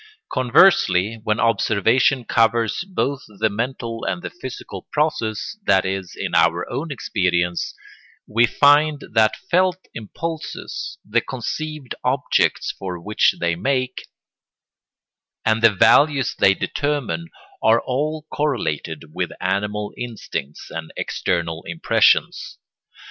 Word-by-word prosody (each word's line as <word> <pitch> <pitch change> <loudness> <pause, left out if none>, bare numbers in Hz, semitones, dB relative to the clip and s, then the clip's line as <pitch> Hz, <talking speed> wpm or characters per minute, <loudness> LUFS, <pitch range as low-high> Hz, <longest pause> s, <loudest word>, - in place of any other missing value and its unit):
Conversely, 115 - +4
when 110 -1 0
observation 115 +3 +2
covers 115 +4 +2
both 140 -7 -1 0.2
the 110 +1 +1
mental 115 +1 -4
and 175 - -3
the - - -5
physical 130 -8 -8
process, 150 - -1
that 95 -1 +4
is, 95 -1 -4
in - - -3
our - - +3
own 155 +3 -3
experience, 90 -8 -1 0.5
we 115 +3 +3
find 145 +2 +4
that 110 -1 +4 0.2
felt 185 0 +3 0.2
impulses, 160 +9 -6
the 115 +3 +2
conceived 150 +2 -5
objects - - +1
for 90 -2 -6
which 105 +5 +2
they 85 -1 0
make, 130 +5 -2 1.4
and 110 0 +2
the 115 - +8
values 135 +7 +4
they 95 0 +4
determine 135 - -2 0.3
are 115 +1 +5
all 150 +5 -2
correlated 85 - -2
with - - -2
animal 105 +1 -2
instincts 110 - -6
and 80 -1 -6
external 85 -2 -2
impressions. - - +2
115 Hz, 110 wpm, -21 LUFS, 100-140 Hz, 1.4 s, the